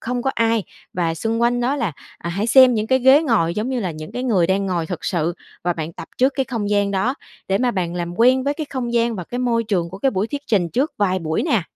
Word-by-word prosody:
không 245 +1 -3
có 270 - +1
ai. 230 -2 +2 0.3
Và 170 -2 -1
xung 225 +7 -2
quanh 245 +1 +2
đó 260 +4 0
là, 225 - -1 0.3
à, 170 - -5
hãy 200 +5 -1
xem 255 0 +7
những 215 0 -1
cái 260 +1 +3
ghế 265 +5 +6
ngồi 190 - +1
giống 215 +4 -2
như 255 -2 -1
là 185 - -2
những 155 -1 -8
cái 250 - -4
người 200 -9 +2
đang 195 +2 0
ngồi 170 -3 -1
thực 175 -2 -6
sự 170 -1 0 0.3
và 175 - +2
bạn 160 0 -5
tập - - -9
trước 260 +2 +3
cái 270 - +1
không 230 -6 -3
gian 205 -1 +2
đó 200 +7 0 0.3
để 195 - +2
mà 250 +1 +2
bạn 180 -5 -2
làm 175 0 -4
quen 255 +3 +4
với 285 +1 0
cái 310 -2 -5
không 245 -3 -3
gian 235 0 +1
và 180 - -5
cái 245 - -5
môi 235 -2 +1
trường 180 -6 -1
của 190 - -8
cái 270 +4 +2
buổi 190 0 -1
thuyết 285 +4 -5
trình 185 -6 +1
trước 265 - 0
vài 185 -2 +1
buổi 160 -2 -1
nè. 220 -6 +1
220 Hz, 280 wpm, -21 LUFS, 180-250 Hz, 0.3 s, xem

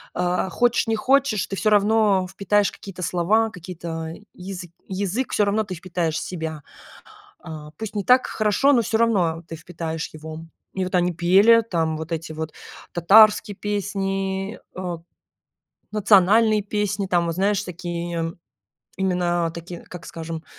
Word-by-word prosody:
а, 180 +1 0
хочешь 240 +5 +1
не 225 - +1
хочешь, 255 -6 +2
ты 195 - -5
всё 215 +2 +1
равно 210 -2 +3
впитаешь 205 +1 +1
какие-то 185 -2 -9
слова, 210 +7 +2
какие-то 170 -3 -6 0.2
язы 180 -2 -8 0.2
язык, 200 +6 -2
всё 205 - +3
равно 210 +2 +1
ты 190 -3 -6
впитаешь 170 -2 -2
в - - -3
себя. 160 -4 -5 0.8
А, 155 -2 -9
пусть 220 -1 -6
не 200 - -2
так 255 +1 +5
хорошо, 215 +6 +2
но 245 -4 +4
всё 225 +1 0
равно 180 -8 +1
ты 165 - -6
впитаешь 165 -1 -5
его. 155 0 -8 0.3
И 190 -1 -1
вот 185 - -3
они 180 0 +2
пели 195 +7 +5
там 160 -3 0
вот 160 +1 -5
эти 160 -1 -4
вот 160 0 -5 0.4
татарские 210 +4 +5
песни, 195 0 -2 0.2
э, 180 -2 -4 1.0
национальные 215 +1 +4
песни 205 -1 -2
там 175 -2 +1
вот 165 0 -3
знаешь 200 +1 +1
такие 170 -1 -4 0.6
именно 175 -3 0
такие, 170 +1 -8
как 180 -2 -11
скажем, 165 -1 -6
185 Hz, 150 wpm, -23 LUFS, 170-210 Hz, 1.0 s, так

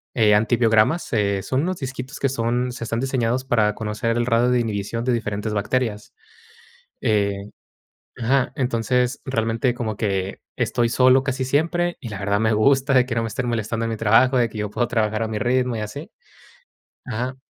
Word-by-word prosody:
eh, 110 -3 +4
antibiogramas, 115 +6 +2
eh, 100 -3 +1
son 130 +1 0
unos 185 +3 -2
disquitos 130 -1 -6
que 135 - +2
son, 125 0 -1
se 120 - -7
están 115 0 -2
diseñados 130 -1 -1
para 110 -5 +2
conocer 110 +2 -2
el 120 - +1
radio 120 0 +2
de 125 0 +3
inhibición 115 0 -2
de 125 - +2
diferentes 105 -2 -2
bacterias. 105 +1 -2 0.9
Eh, 100 -3 0 0.7
ajá, 130 +2 +1
entonces, 125 -1 0
realmente 115 -1 0
como 110 -3 -4
que 95 -3 -2 0.2
estoy 120 -1 0
solo 130 +2 +4
casi 135 0 -2
siempre, 170 +6 0
y 120 - -7
la 105 -3 -6
verdad, 100 0 0
me 110 0 +2
gusta 135 +5 +3
de 125 -2 +5
que 120 - -3
no 115 - +1
me - - -2
estén 125 +3 -3
molestando 115 0 -2
en - - -2
mi 110 - -3
trabajo, 115 +5 +4
de 120 -2 +2
que 110 - -10
yo 105 0 -2
puedo 120 +4 -1
trabajar 110 -2 0
a - - -2
mi 110 -1 -3
ritmo 125 +2 +1
y - - -3
así. 125 +10 -7 0.9
Ajá. 125 +2 -3
115 Hz, 190 wpm, -22 LUFS, 110-130 Hz, 0.9 s, de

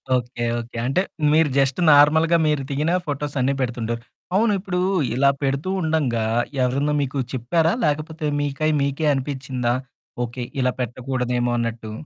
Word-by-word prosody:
Okay. 120 -1 -3 0.2
Okay. 115 0 -8
అంటే, 135 +8 +2 0.3
మీరు 155 -1 +4
just 135 +3 +2
నార్మల్‌గా 160 +3 +5
మీరు 150 -2 +1
దిగిన 150 +4 0
ఫోటోస్ 145 0 -3
అన్ని 135 +2 +2
పెడుతుంటారు. 120 -2 -2 0.3
అవును. 215 0 +3
ఇప్పుడు 180 -2 -3 0.4
ఇలా 140 +1 +4
పెడుతూ 140 +6 -1
ఉండంగా, 140 -9 0 0.4
ఎవరన్నా 140 +4 +1
మీకు 140 0 -2
చెప్పారా? 160 +7 +1
లేకపోతే, 155 +1 -2 0.2
మీకై 145 +2 0
మీకే 140 +3 0
అనిపిచ్చిందా 130 -3 -2 0.5
ఓకే. 120 +1 -6 0.2
ఇలా 125 0 +1
పెట్టకూడదేమో 125 0 -1
అన్నట్టు? 115 -2 -4
140 Hz, 135 wpm, -22 LUFS, 125-155 Hz, 0.5 s, నార్మల్‌గా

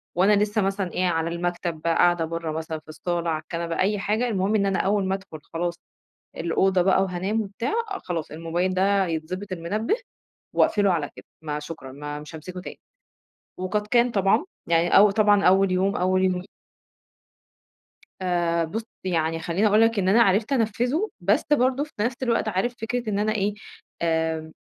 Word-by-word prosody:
وأنا 190 +4 +4
لسّه 210 +1 +2
مثلًا، 195 -2 -1
إيه 185 - 0
على 165 -1 0
المكتب، 170 -1 -3
بقى 165 0 +1
قاعدة 175 -2 +3
برّه 165 0 -4
مثلًا 160 0 -4
في 155 - -32
الصالة 170 +2 -2
على 155 -1 -1
الكنبة 170 +1 -4
أي 205 +2 +2
حاجة، 215 +5 0
المهم 200 -1 0
إن 200 -2 +2
أنا 195 -1 +1
أوّل 200 0 +1
ما 190 0 0
أدخل 190 -5 -9
خلاص 170 +1 -1 0.6
الأوضة 185 +3 +2
بقى 190 +1 +3
وهانام 190 +4 -1
وبتاع، 210 +4 -4 0.3
خلاص 165 -3 -4
الموبايل 170 +4 -1
ده 195 +1 +2
يتضبط 180 +4 -4
المنبه 195 - -1 0.6
وأقفله 200 -3 +3
على 150 -4 -1
كده، - - -12 0.2
ما 150 -1 -3
شكرًا 150 -3 -8
ما 145 +1 -6
مش 150 +1 -11
هامسكه 180 +4 -7
تاني، - - -9 0.8
وقد 210 +3 -2
كان 240 +2 +3
طبعًا، 195 - +2 0.2
يعني 170 +1 +3
او 205 +1 +8
طبعًا 205 -1 +3
أوّل 190 +1 +4
يوم 190 +2 +1
أوّل 185 +1 +2
يو 180 -1 +1 1.8
آآ 175 -2 +1
بُص 220 +8 -4 0.2
يعني 165 -3 0
خلّيني 175 +6 +1
أقول 210 +1 +4
لك 225 -1 +3
إن 185 -1 +1
أنا 225 +5 +5
عرفت 215 +4 +3
أنفّذه، 250 - 0
بس 195 +5 +2
برضه 260 0 +2
في 305 - -12
نفس 235 +4 0
الوقت 230 -3 +1
عارف 215 +4 -1
فكرة 240 0 -2
إن 200 -1 0
أنا 215 +1 +1
إيه، 205 0 0 0.5
آآ 160 -1 0
185 Hz, 175 wpm, -24 LUFS, 170-210 Hz, 1.8 s, او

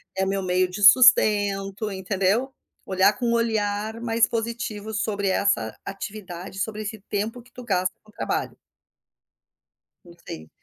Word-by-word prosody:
É 190 0 0
meu 195 0 -1
meio 185 0 +2
de 195 +3 -7
sustento". 205 -3 +5
Entendeu. 195 +6 0 0.3
Olhar 190 +2 +3
com 245 - -1
um 235 - +2
olhar 220 -1 -1
mais 230 -1 +2
positivo 225 -2 -4
sobre 205 -2 -1
essa 120 - +1
atividade. 195 -2 -7
Sobre 215 +2 -3
esse 215 0 -6
tempo 220 +4 -3
que 250 - -23
tu 250 - -10
gasta 185 -4 0
no 215 - -19
trabalho. - - -3 1.5
Não 175 - -15
sei. 80 0 -8
205 Hz, 140 wpm, -24 LUFS, 190-225 Hz, 1.5 s, sustento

